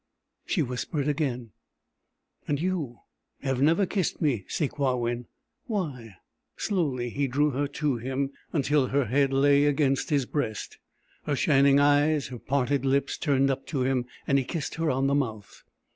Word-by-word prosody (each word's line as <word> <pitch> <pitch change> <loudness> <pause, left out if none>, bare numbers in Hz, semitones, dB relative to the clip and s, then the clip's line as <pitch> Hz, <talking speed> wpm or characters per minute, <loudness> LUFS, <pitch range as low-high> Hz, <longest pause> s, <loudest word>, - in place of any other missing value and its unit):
She 170 - +1
whispered 135 +3 -3
again: 130 -6 -1 1.0
"And 145 -1 0
you 160 -9 -2 0.4
have 135 -2 -1
never 165 +7 +4
kissed 190 -2 -1
me, 125 - 0
Sakewawin. 125 -5 -1 0.4
Why?" 140 - -4 0.4
Slowly 140 - -1
he 140 +2 0
drew 145 +3 +2
her 140 +2 -1
to 145 -2 -1
him, 135 +3 -2 0.2
until 145 -3 +2
her 140 0 +1
head 135 +4 +2
lay 140 +1 +4
against 140 +1 +1
his 145 -4 +2
breast, 120 -6 -3 0.5
her 145 - 0
shining 140 -1 +4
eyes 145 0 +3
and 125 - -8
parted 135 0 0
lips 140 +1 +1
turned 135 -3 +2
up 135 0 -4
to 140 -5 -1
him, 130 -1 0 0.2
and 140 - +3
he - - -1
kissed 150 +3 -4
her 165 -1 -1
on 135 0 +1
the 140 - +2
mouth. 110 -8 -3
140 Hz, 155 wpm, -27 LUFS, 130-145 Hz, 1.0 s, never